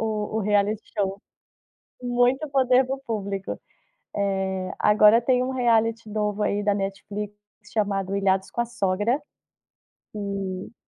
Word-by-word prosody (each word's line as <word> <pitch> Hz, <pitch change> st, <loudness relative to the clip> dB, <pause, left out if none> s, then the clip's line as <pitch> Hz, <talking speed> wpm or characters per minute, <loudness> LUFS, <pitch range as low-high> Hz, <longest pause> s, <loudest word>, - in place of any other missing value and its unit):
o 215 Hz, -1 st, -2 dB
o -, -, 0 dB
reality 205 Hz, +1 st, +1 dB, 0.2 s
show. 195 Hz, 0 st, -1 dB, 0.8 s
Muito 245 Hz, +4 st, +1 dB
poder 260 Hz, -1 st, +4 dB
do 270 Hz, +1 st, -2 dB
público. 200 Hz, -3 st, -3 dB, 0.6 s
Eh, 190 Hz, -2 st, -1 dB
agora 210 Hz, +2 st, +6 dB
tem 250 Hz, +1 st, +2 dB
um 260 Hz, -, -2 dB
reality 230 Hz, -3 st, +1 dB
novo 210 Hz, 0 st, -1 dB
aí 205 Hz, 0 st, +1 dB
da 205 Hz, 0 st, +2 dB
Netflix 200 Hz, +1 st, -4 dB, 0.4 s
chamado 200 Hz, -2 st, 0 dB
Ilhados 190 Hz, -1 st, +1 dB
com 235 Hz, -, -2 dB
a -, -, -2 dB
Sogra. 215 Hz, +3 st, 0 dB, 0.9 s
E 195 Hz, 0 st, -4 dB
210 Hz, 125 wpm, -25 LUFS, 195-235 Hz, 0.9 s, agora